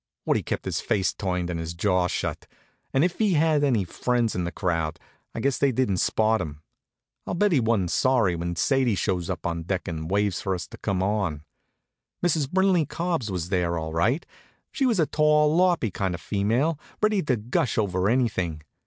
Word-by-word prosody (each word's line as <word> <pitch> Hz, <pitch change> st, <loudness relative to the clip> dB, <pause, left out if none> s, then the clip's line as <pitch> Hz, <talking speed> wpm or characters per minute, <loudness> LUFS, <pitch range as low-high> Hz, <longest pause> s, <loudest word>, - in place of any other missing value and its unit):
Woodie -, -, +2 dB
kept -, -, -4 dB
his -, -, -2 dB
face 95 Hz, -3 st, 0 dB
turned 90 Hz, -2 st, -2 dB
and 85 Hz, -, -3 dB
his 80 Hz, +1 st, -5 dB
jaw 90 Hz, 0 st, +2 dB
shut, -, -, -3 dB, 0.4 s
and 135 Hz, +2 st, +3 dB
if 175 Hz, 0 st, 0 dB
he 210 Hz, -4 st, +3 dB
had 155 Hz, -2 st, +3 dB
any 120 Hz, -8 st, +2 dB
friends 120 Hz, +5 st, 0 dB
in 90 Hz, -, -2 dB
the 85 Hz, -, -3 dB
crowd 85 Hz, -4 st, -2 dB, 0.4 s
I -, -, -3 dB
guess 140 Hz, -1 st, 0 dB
they 140 Hz, -, +3 dB
didn't 115 Hz, -6 st, 0 dB
spot 110 Hz, +3 st, +2 dB
him. 75 Hz, -3 st, -7 dB, 0.6 s
I'll -, -, -2 dB
bet 205 Hz, +3 st, +2 dB
he 150 Hz, -, +4 dB
wa'n't 110 Hz, -7 st, +1 dB
sorry 120 Hz, -9 st, +2 dB
when 85 Hz, +1 st, -3 dB
Sadie 130 Hz, +2 st, +2 dB
shows 90 Hz, -1 st, -1 dB
up 85 Hz, -4 st, -4 dB
on 85 Hz, -1 st, -2 dB
deck 90 Hz, +2 st, -3 dB
and 80 Hz, -1 st, -4 dB
waves 100 Hz, -1 st, +1 dB
for 95 Hz, -1 st, -1 dB
us 90 Hz, -3 st, -5 dB
to -, -, -12 dB
come 95 Hz, -3 st, -1 dB
on. 95 Hz, -7 st, -1 dB, 0.8 s
Mrs. 155 Hz, -5 st, +1 dB
Brinley 190 Hz, -4 st, +3 dB
Cubbs 165 Hz, -9 st, -2 dB
was 90 Hz, -2 st, -3 dB
there, 90 Hz, -3 st, 0 dB
all 80 Hz, -1 st, -4 dB
right. 115 Hz, -, +1 dB, 0.5 s
She 270 Hz, -, +1 dB
was 225 Hz, -6 st, +1 dB
a 160 Hz, -, +4 dB
tall, 150 Hz, 0 st, +3 dB
loppy 175 Hz, -, +3 dB
kind 95 Hz, -1 st, -2 dB
of 85 Hz, -, -10 dB
female, 120 Hz, +10 st, 0 dB, 0.2 s
ready 215 Hz, -2 st, +2 dB
to 135 Hz, -6 st, +1 dB
gush 125 Hz, +7 st, -1 dB
over 95 Hz, -2 st, +1 dB
anything. 95 Hz, -11 st, 0 dB
105 Hz, 195 wpm, -25 LUFS, 90-145 Hz, 0.8 s, he